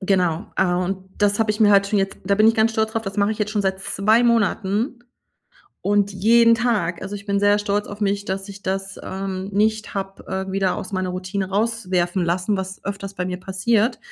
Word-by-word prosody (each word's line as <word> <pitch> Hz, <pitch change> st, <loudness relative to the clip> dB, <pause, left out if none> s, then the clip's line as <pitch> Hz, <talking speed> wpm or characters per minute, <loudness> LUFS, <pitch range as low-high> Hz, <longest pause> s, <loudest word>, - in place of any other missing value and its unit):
Genau. 185 Hz, -2 st, +1 dB
Äh, 180 Hz, -2 st, +2 dB
und 185 Hz, +1 st, -3 dB
das 205 Hz, 0 st, +2 dB
habe 220 Hz, -1 st, +2 dB
ich 210 Hz, +1 st, -3 dB
mir 205 Hz, -1 st, +6 dB
halt 200 Hz, 0 st, +5 dB
schon 205 Hz, 0 st, +1 dB
jetzt 195 Hz, 0 st, -1 dB
da 200 Hz, +1 st, +2 dB
bin 215 Hz, +2 st, +4 dB
ich 225 Hz, -, +3 dB
ganz 220 Hz, 0 st, +3 dB
stolz 220 Hz, 0 st, 0 dB
drauf, 225 Hz, -, -1 dB
das 195 Hz, -1 st, -6 dB
mache 205 Hz, +1 st, +2 dB
ich -, -, -8 dB
jetzt 210 Hz, -1 st, -1 dB
schon 210 Hz, -1 st, 0 dB
seit 190 Hz, 0 st, -1 dB
2 215 Hz, +5 st, +2 dB
Monaten. 230 Hz, +1 st, +1 dB, 0.8 s
Und 205 Hz, 0 st, +2 dB
jeden 230 Hz, +4 st, +5 dB
Tag, 215 Hz, -8 st, 0 dB
also, 195 Hz, +2 st, -5 dB
ich 200 Hz, 0 st, -12 dB
bin 200 Hz, -1 st, +1 dB
sehr 205 Hz, 0 st, +4 dB
stolz 205 Hz, 0 st, -1 dB
auf 205 Hz, +1 st, -8 dB
mich, 200 Hz, 0 st, 0 dB
dass 195 Hz, +1 st, -4 dB
ich 200 Hz, 0 st, -10 dB
das, 195 Hz, +1 st, -3 dB
ähm, 190 Hz, 0 st, -4 dB
nicht 215 Hz, +2 st, 0 dB
habe, 195 Hz, 0 st, -5 dB, 0.2 s
äh, -, -, -5 dB
wieder 195 Hz, -1 st, +1 dB
aus 190 Hz, -, -6 dB
meiner 185 Hz, -1 st, -1 dB
Routine 185 Hz, +1 st, -3 dB
rauswerfen 190 Hz, -4 st, 0 dB
lassen, 185 Hz, +4 st, 0 dB
was 190 Hz, 0 st, -6 dB
öfters 200 Hz, 0 st, -5 dB
bei 180 Hz, -1 st, -3 dB
mir 180 Hz, 0 st, -4 dB
passiert. 215 Hz, +5 st, 0 dB
200 Hz, 220 wpm, -22 LUFS, 190-215 Hz, 0.8 s, mir